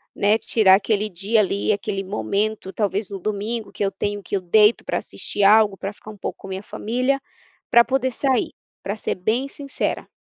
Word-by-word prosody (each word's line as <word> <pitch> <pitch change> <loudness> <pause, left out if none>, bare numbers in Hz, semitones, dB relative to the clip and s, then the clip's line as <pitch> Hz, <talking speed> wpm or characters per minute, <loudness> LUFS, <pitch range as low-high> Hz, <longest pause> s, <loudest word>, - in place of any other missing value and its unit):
né, 210 +2 +3
tirar 200 -5 +4
aquele 210 +1 0
dia 205 +5 +1
ali, 200 +2 0
aquele 200 -1 -2
momento, 200 0 -2
talvez 205 -1 -1
no 195 -1 -6
domingo, 215 +3 -3
que - - -3
eu 195 - 0
tenho, 205 0 -3
que 200 - -3
eu 190 - -1
deito 210 +5 +4
para - - -2
assistir 205 - -2
algo, 205 -1 +5
para 195 +1 -5
ficar 215 - -14
um 210 - -10
pouco - - -5
com 195 - -10
minha 190 +1 -5
família, 255 +7 -1 0.5
para 235 0 +7
poder 260 0 0
sair, 260 -1 0 0.3
para 200 +2 -3
ser - - -3
bem 225 +9 -1
sincera. 280 0 -4
210 Hz, 195 wpm, -22 LUFS, 195-225 Hz, 0.5 s, para